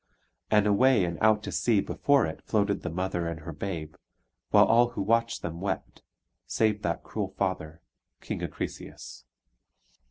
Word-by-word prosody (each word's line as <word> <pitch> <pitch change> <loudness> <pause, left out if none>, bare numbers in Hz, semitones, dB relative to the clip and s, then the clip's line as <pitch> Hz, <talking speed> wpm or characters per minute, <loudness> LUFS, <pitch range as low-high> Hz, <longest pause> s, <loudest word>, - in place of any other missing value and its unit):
And 105 -1 +4
away 105 0 +4
and 85 -1 -4
out 110 -1 +4
to - - -5
sea 115 -4 +2
before 140 +7 +2
it 80 - -6
floated 100 -2 0
the - - -4
mother 90 0 -2
and 85 -2 -5
her 80 +2 -7
babe, 80 -2 -5 0.6
while - - +6
all 120 +1 +4
who - - -4
watched 115 +3 +1
them 85 0 -5
wept, 100 - -4 0.5
save 105 -2 +1
that 85 -3 -2
cruel 100 -3 -4
father, 85 -4 -2 0.4
King - - -5
Acrisius. - - -7
100 Hz, 155 wpm, -28 LUFS, 85-110 Hz, 0.6 s, while